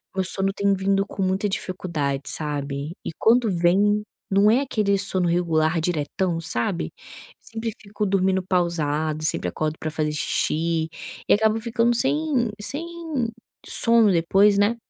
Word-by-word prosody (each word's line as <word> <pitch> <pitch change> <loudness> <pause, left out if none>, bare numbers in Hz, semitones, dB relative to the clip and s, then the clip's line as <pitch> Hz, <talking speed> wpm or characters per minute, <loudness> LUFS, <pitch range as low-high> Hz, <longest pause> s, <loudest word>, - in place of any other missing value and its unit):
o 190 - +1
sono 195 +1 +3
tem 200 0 +1
vindo 195 +1 +1
com 195 - -4
muita 190 +2 0
dificuldade 155 -8 -3
sabe. 145 0 -4
E - - -4
quando 230 0 +3
vem 195 +5 +2 0.3
não 200 +2 +5
é 245 +5 +4
aquele 210 -7 0
sono 190 -2 0
regular 165 -1 +1
diretão, 165 +1 -1
sabe? 165 +3 -2 0.5
Sempre 225 0 -5
fico 210 +1 -6
dormindo 190 -1 +1
pausado, 160 -4 -1
sempre 120 - 0
acordo 155 - -2
para 155 - -4
fazer 155 -1 -1
xixi 160 +2 -1 0.4
e - - +7
acabo 220 +1 +2
ficando 235 +1 +1
sem 265 -3 +1
sem 280 +10 -4 0.8
sono 230 -3 +5
depois, 195 +4 +3
né. 205 +3 +3
190 Hz, 140 wpm, -23 LUFS, 160-210 Hz, 0.8 s, e